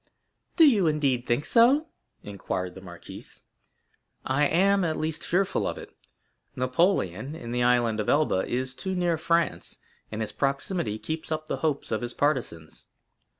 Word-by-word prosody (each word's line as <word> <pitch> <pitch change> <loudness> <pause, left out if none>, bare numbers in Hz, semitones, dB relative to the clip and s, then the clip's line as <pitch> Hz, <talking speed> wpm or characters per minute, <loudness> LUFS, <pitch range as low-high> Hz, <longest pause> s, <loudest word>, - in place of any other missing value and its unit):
0087m - - -42
"Do 325 -3 +7
you, 205 - +4
indeed, 140 -5 0
think 120 +5 0
so?" 265 +7 +4 0.4
inquired 90 -2 -4
the 95 - -11
marquise. 85 -2 -12 0.8
"I 145 +3 +2
am, 195 +4 +3
at 160 -2 -1
least, 155 0 -3
fearful 190 +2 0
of - - -3
it. - - -11 0.6
Napoleon, 130 - 0
in 120 -8 -7
the 125 0 -1
Island 120 -2 +2
of 105 - -1
Elba, 145 -11 +2
is 130 +1 -2
too 190 +7 -4
near 175 -3 0
France, 170 +1 0 0.3
and 110 +1 -4
his 105 -1 -3
proximity 135 - -1
keeps 160 +7 -5
up 155 0 -2
the - - -3
hopes 150 -3 -2
of 110 - -1
his 120 0 -5
partisans. 125 - -2
145 Hz, 160 wpm, -26 LUFS, 120-170 Hz, 0.8 s, Do